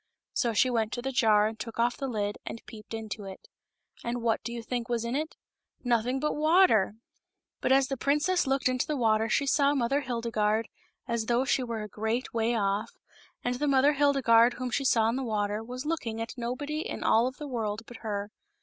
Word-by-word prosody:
So 235 - +1
she 255 +4 +3
went 225 -2 0
to 240 - -4
the 270 - -2
jar 215 -4 +4
and 220 +1 -3
took 230 -2 -7
off 240 +1 +2
the 275 - -4
lid 205 -4 -2
and 230 - -7
peeped 220 0 -9
into 215 -2 -6
it. 190 -1 -10 0.6
And 235 0 -3
what 225 -2 +1
do 235 - -4
you 235 -1 -5
think 240 0 -3
was 235 -1 -1
in 235 +2 -2
it? 310 +3 -3 0.5
Nothing 245 +1 +1
but 300 +2 0
water! 305 - +4 0.6
But - - 0
as 270 0 +5
the 270 0 -3
princess 300 +6 +1
looked 270 0 +1
into 255 +1 0
the 300 -2 -1
water 220 -2 +2
she 280 - +2
saw 280 +1 +3
Mother 275 +2 +1
Hildegarde 230 -3 -1 0.4
as 235 -2 -1
though 240 +2 +2
she 270 - +2
were 230 -3 -3
a - - -6
great 220 +4 -3
way 230 +1 +1
off, 200 -1 -1 0.5
and 245 0 -1
the 295 - 0
Mother 275 +1 +4
Hildegarde 255 -5 +4
whom 255 -1 -4
she 275 - -1
saw 225 -4 +4
in 230 +3 0
the 270 - -2
water 210 -2 -1
was 250 +4 -7
looking 270 -9 -2
at 230 0 -4
nobody 260 +5 -3
in - - -4
all 230 +3 +4
of 260 - -6
the 300 - -6
world 220 -4 -3
but 240 - -11
her. 205 -2 -4
235 Hz, 215 wpm, -28 LUFS, 220-270 Hz, 0.6 s, as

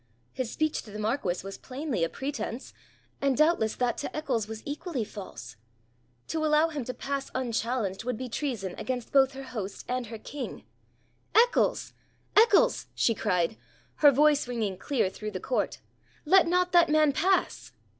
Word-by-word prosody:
His 255 -3 -3
speech 310 -1 0
to - - -14
the 210 - -7
marquis 215 -5 -1
was 195 0 -7
plainly 265 - -3
a 165 - +1
pretence, 270 -2 -5 0.5
and 275 -2 +2
doubtless 305 -8 +3
that 245 -1 0
to - - -5
Eccles 250 -8 -1
was 220 0 -7
equally 290 -2 -3
false. 120 - -9 0.7
To 320 -1 -1
allow 310 +1 +4
him 295 -4 -4
to 255 - -4
pass 275 0 -3
unchallenged 230 -5 -1
would 245 -1 -2
be 255 - -5
treason 230 -7 -3
against 250 -2 -4
both 270 -1 +4
her 270 0 -7
host 215 -7 -6
and 250 -1 -2
her 225 +1 -7
king. 270 +4 -7 0.7
'Eccles! 480 +2 +3 0.4
Eccles!' 460 +3 +5
she 230 - +3
cried, 185 -2 0 0.4
her 295 - +8
voice 290 0 +4
ringing 225 -6 -2
clear 235 +3 0
through 215 +3 -6
the 190 -3 -5
court, 250 - -1 0.5
'let 370 +3 +6
not 360 +1 +2
that 345 -2 +5
man 305 -1 +4
pass.' 375 +5 +1
255 Hz, 165 wpm, -28 LUFS, 220-300 Hz, 0.7 s, her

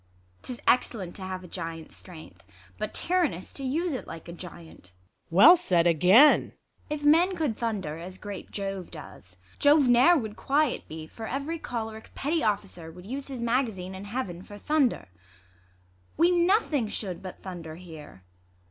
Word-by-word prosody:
'Tis 250 -2 -7
excellent 205 -7 +1
to - - -7
have 185 0 -5
a - - -10
giant's 165 -2 -7
strength, 155 - -13 0.4
But 215 - -3
tyrannous 340 - 0
to 275 - -5
use 320 +6 -1
it 255 - -5
like 165 -1 -9
a - - -7
giant, 170 - -11
Luc. 90 +2 -28
Well 190 - +8
said 180 - +2
again 185 - +6 0.2
.' - - -35
ISAB. 300 - -1
If - - -12
men 335 +6 +4
could 305 -10 -1
thunder 195 -10 -3
As 185 +2 -8
great 205 -1 -8
Jove 195 -3 -5
does, 90 - -11 0.2
Jove 290 -1 +5
ne'er 250 +9 +6
would 220 -6 -4
quiet 290 0 0
be; 155 0 -7
For 220 +7 -8
ev^ery 295 +5 -4
cholerick 220 -2 -6
petty 310 +4 0
officer 195 -6 -2
Would 180 +2 -13
use 270 +6 -5
his 265 -4 -6
mag 245 +3 +2
azine 190 -3 -7
in 190 +1 -8
heaven 200 -6 -4
for 205 +2 -11
thunder; 290 - +1 1.1
We 340 +3 +4
nothing 345 - +2
should 195 -4 -5
but 185 -1 -9
thunder 170 -4 -7
hear. 160 - -12
205 Hz, 175 wpm, -27 LUFS, 175-275 Hz, 1.1 s, Well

